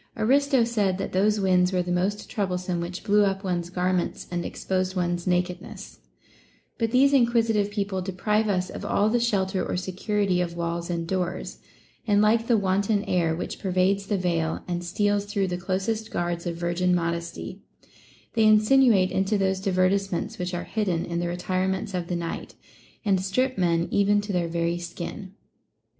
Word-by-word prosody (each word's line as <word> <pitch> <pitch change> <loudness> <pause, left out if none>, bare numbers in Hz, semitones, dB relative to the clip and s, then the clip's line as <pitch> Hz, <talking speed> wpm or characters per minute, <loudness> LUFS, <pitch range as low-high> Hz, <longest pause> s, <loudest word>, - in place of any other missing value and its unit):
Aristo 265 +3 +3
said 210 -5 0
that 195 - -4
those 205 +3 +2
winds 185 -1 +3
were 180 -1 +1
the 180 - -4
most 195 +4 -1
troublesome 180 -4 -2
which 175 +1 -5
blew 205 0 +4
up 195 0 0
one's 175 -2 -2
garments 180 0 -1
and 175 -1 -2
exposed 185 +1 -2
one's 175 -1 -1
nakedness; 180 0 -3 0.8
but 225 -1 +1
these 270 +4 +4
inquisitive 230 -5 +3
people 200 -2 -2
deprive 210 +4 0
us 185 -2 0
of - - -7
all 205 +1 +2
the 240 - +2
shelter 195 -5 0
or - - -2
security 190 0 0
of 175 -1 -2
Avails 170 0 -3
and 170 -1 -2
doors, 185 0 -3 0.5
and 205 -1 +4
like 225 +2 +3
the 235 - +4
wanton 200 +1 +1
air, 170 -5 +1
which 175 - -5
pervades 195 +1 +1
the 205 - 0
veil 170 -3 -1
and 175 -1 -2
steals 205 +3 0
through 200 -1 -1
the 175 - -2
closest 195 +5 -2
guards 175 -1 -2
of 170 - -2
virgin 175 +1 +1
modesty, 170 0 -3 0.7
they 225 -2 +3
insinuate 215 -2 +5
into 195 +2 +1
those 190 -1 +1
divertisements 190 -1 0
which 180 0 -3
are 175 - -3
hidden 190 -7 -1
in 170 0 -3
the 175 - -1
retirements 185 +2 -2
of 175 -2 -2
the 175 - -2
night, 170 -1 -5 0.5
and 195 -3 +2
strip 255 +8 0
men 170 -2 +1
even 205 0 +3
to 205 -1 -5
their 175 -2 0
very 170 +1 -1
skin. 175 +3 -7
190 Hz, 170 wpm, -25 LUFS, 175-205 Hz, 0.8 s, insinuate